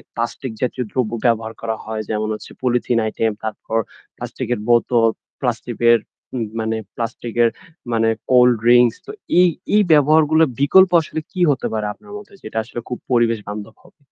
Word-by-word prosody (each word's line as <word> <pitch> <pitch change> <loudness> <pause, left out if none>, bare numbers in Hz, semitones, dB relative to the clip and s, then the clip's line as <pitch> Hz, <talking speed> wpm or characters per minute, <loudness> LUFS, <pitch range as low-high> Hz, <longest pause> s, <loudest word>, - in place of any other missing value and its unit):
এ - - -18
plastic 120 +1 -4
জাতীয় 125 0 -1
দ্রব্য 120 -4 -1
ব্যবহার 115 -1 +1
করা 110 -1 -2
হয় 110 0 -4
যেমন 110 0 -1
হচ্ছে - - -10
পলিথিন 120 -1 +1
আইটেম, 110 0 -1
তারপর 110 +1 -3 0.4
প্লাস্টিকের 120 -2 -4
বোতল, 120 -1 +4 0.3
প্লাস্টিকের 120 -1 +2 0.4
উ - - -1 0.2
মানে 110 0 -1 0.2
প্লাস্টিক 115 0 -5
এর 115 - +4 0.4
মানে 115 0 +2 0.2
কোল্ড 125 -1 +6
ড্রিংকস 120 -1 +5
তো - - -8 0.3
এই, 180 - +6 0.3
এই, 210 - +6
ব্যবহারগুলোর 155 +1 +5
বিকল্প 185 +6 +6
আসলে 160 0 -5
কি 185 - -5
হতে 135 - -1
পারে 110 -1 -2
আপনার 205 - -16
মধ্যে 205 -1 -12
যেটা 110 +1 -5
আসলে 120 +1 -7
খুব 125 - -4
পরিবেশ 120 -2 +2
বান্ধব 105 +2 -7
হবে। - - -22
120 Hz, 165 wpm, -20 LUFS, 110-130 Hz, 0.4 s, কোল্ড